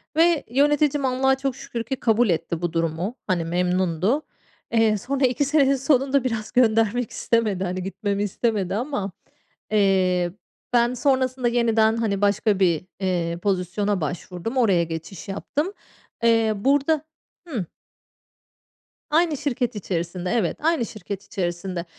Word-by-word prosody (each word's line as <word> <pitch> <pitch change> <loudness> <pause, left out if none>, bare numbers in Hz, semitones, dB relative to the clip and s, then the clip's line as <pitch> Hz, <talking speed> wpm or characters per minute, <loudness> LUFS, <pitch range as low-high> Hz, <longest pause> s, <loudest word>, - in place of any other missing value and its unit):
ve 330 -1 +4
yöneticim 290 +1 +2
Allah'a 265 +1 +2
çok 270 -2 -2
şükür 235 -1 -5
ki 265 +4 -3
kabul 230 -2 +2
etti 165 0 -1
bu 175 -1 -2
durumu. 165 +6 -1
Hani, 175 -4 0
memnundu. 180 - +1 0.5
Eee, 225 -2 +3
sonra 270 +5 0
iki 255 +3 +1
senenin 275 -1 +3
sonunda 270 0 +2
biraz 225 -4 -3
göndermek 225 -1 +2
istemedi. 215 -5 0
Hani, 185 0 -3
gitmemi 200 +1 -2
istemedi 205 -2 -1
ama, 215 -5 -2 0.6
eee, 185 -4 +2 0.4
ben 240 0 +3
sonrasında 260 -1 +1
yeniden, 225 -2 +3
hani, 205 -3 -1
başka 205 0 +2
bir, 175 -2 +2
eee, 175 -3 -1
pozisyona 195 +1 0
başvurdum. 180 - -4
Oraya 195 -8 +4
geçiş 165 +1 -7
yaptım. 295 - -3 0.5
Eee, 225 -1 +4
burada 285 +7 +2 0.4
Hımm. 235 - -3 1.5
Aynı 320 -1 +3
şirket 250 -5 -2
içerisinde, 180 -1 -3
evet, 220 -9 0
aynı 310 -6 +1
şirket 200 -2 -7
içerisinde. 175 -1 -3
220 Hz, 130 wpm, -23 LUFS, 185-260 Hz, 1.5 s, ve